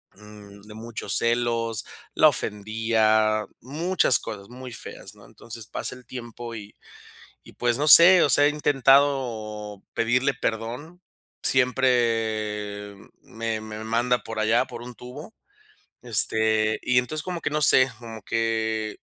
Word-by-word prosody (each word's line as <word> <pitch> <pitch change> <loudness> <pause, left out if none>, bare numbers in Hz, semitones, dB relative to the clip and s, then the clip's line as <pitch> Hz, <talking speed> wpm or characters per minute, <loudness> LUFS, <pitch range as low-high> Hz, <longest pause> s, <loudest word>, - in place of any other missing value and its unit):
Mm, 105 -1 -15
de 105 0 -13
muchos 115 +1 -2
celos, 115 -2 -1 0.3
la - - +5
ofendía, 110 0 0 0.2
muchas 155 0 +1
cosas 100 -2 -8
muy 125 0 -10
feas, 105 -2 -9
¿no? 100 - -18
Entonces, 115 +1 -11
pasa - - -5
el 125 - -16
tiempo 120 -1 -8
y 105 -2 -10 0.7
y - - -16
pues, 120 -1 -1
no 150 - 0
sé, 175 +4 +9
o 145 - +2
sea, 145 - +4
he - - +4
intentado 130 -8 0
pedirle 125 +4 +1
perdón. 120 +11 -5 0.4
Siempre 110 -5 0 0.3
me 115 -1 -4
me 110 0 -8
manda 120 +2 0
por 115 -1 -6
allá, 110 +2 +2
por 120 -2 -10
un 125 0 -9
tubo. 140 - -11 0.7
Este, 110 -1 +2
y 125 0 +2
entonces 145 +5 -3
como 180 -2 -5
que - - -3
no 150 +1 -1
sé, 130 -2 +5
como 115 -2 -10
que 110 -1 -2
115 Hz, 140 wpm, -24 LUFS, 110-125 Hz, 0.7 s, sé